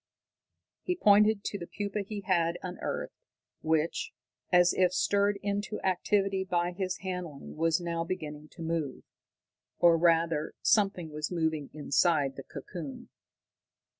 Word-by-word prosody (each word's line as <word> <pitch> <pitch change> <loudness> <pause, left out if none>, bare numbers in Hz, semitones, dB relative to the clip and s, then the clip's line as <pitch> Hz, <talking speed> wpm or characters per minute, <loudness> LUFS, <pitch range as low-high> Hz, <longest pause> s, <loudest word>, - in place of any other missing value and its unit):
He 360 - -1
pointed 210 - +5
to 200 - -3
the 170 - -7
pupa 205 0 -3
he 205 +1 -6
had 170 -3 +1
unearthed, 180 -1 -4 0.5
which, 160 0 0 0.4
as 180 -1 +5
if 180 -1 +3
stirred 200 +2 +2
into 205 +1 -2
activity 195 +1 +1
by 175 -2 0
his 185 0 -3
handling, 180 -6 -6
was 165 +1 +2
now 170 -1 -2
beginning 155 -4 -5
to 165 - -8
move. 160 -5 -2 0.7
Or, 170 -1 +5
rather, 165 -2 +2
something 195 -6 +2
was 150 0 -3
moving 160 -4 -1
inside 145 -1 +2
the - - -6
cocoon. 140 +1 -8
175 Hz, 130 wpm, -30 LUFS, 160-195 Hz, 0.7 s, pointed